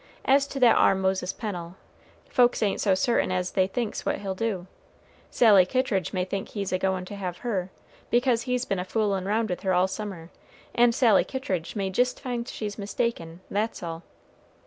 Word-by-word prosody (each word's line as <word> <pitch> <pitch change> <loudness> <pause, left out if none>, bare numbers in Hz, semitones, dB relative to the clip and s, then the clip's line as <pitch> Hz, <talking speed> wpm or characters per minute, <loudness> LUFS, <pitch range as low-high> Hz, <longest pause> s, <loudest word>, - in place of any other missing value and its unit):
As 275 +1 +4
to 275 - -5
that 245 -3 +6
ar - - +5
Moses 190 -1 0
Pennel, 180 -6 -6 0.5
folks 245 -3 +3
ain't 200 - 0
so 195 -3 +3
certain 190 0 +1
as 180 0 -1
they 190 -1 +2
thinks 220 +2 -3
what - - 0
he'll 195 -2 -4
do. 190 -3 -2 0.6
Sally 210 -6 +6
Kittridge 195 -3 0
may 180 -1 -1
think 195 +1 -4
he's 200 -3 -4
a 185 - +1
goin' 190 -1 -1
to 205 - -8
have 180 -3 -4
her, 190 -6 -1 0.4
because 240 -1 +2
he's 250 +1 -1
been 195 - -1
a - - -1
foolin' 195 -1 -1
round 220 +3 +1
with 180 - -4
her 190 -2 +1
all 180 +1 +3
summer, 190 -5 -6 0.4
and 235 -1 +4
Sally 230 -6 +5
Kittridge 255 - -4
may 195 -2 -1
jist 250 +5 +1
find 245 -3 -4
she's 210 -1 -5
mistaken, 190 -5 -3
that's 210 0 -2
all." 165 -1 -5
200 Hz, 190 wpm, -26 LUFS, 185-235 Hz, 0.6 s, that